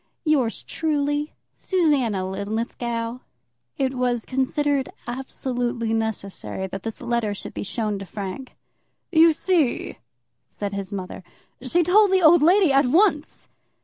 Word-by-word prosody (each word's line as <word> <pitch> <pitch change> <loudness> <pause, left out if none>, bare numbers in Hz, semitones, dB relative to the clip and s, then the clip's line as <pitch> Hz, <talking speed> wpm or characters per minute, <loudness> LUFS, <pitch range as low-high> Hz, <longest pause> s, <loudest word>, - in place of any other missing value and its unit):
Yours 275 -7 +1
truly, 295 -1 -1 0.3
SUSANNA 280 - +1
LINLITHGOW. 230 +4 -3 0.6
It 265 -1 0
was 245 -2 -1
considered 275 +1 0 0.2
absolutely 245 -2 -3
necessary 215 -3 -3
that 190 +1 -6
this 225 +1 -6
letter 235 -4 -1
should - - -8
be - - -5
shown 210 0 -2
to 195 - -7
Frank. 200 +7 -7 0.6
"You 330 -1 +6
see," 320 -4 0 0.5
said 205 -1 -5
his 200 0 -5
mother, 190 -1 -6 0.4
"she 335 +7 +2
told 405 +5 +5
the 375 -1 +3
old 330 +1 +7
lady 355 +1 +5
at 275 -1 +4
once." 315 +1 +1
250 Hz, 125 wpm, -23 LUFS, 220-300 Hz, 0.6 s, old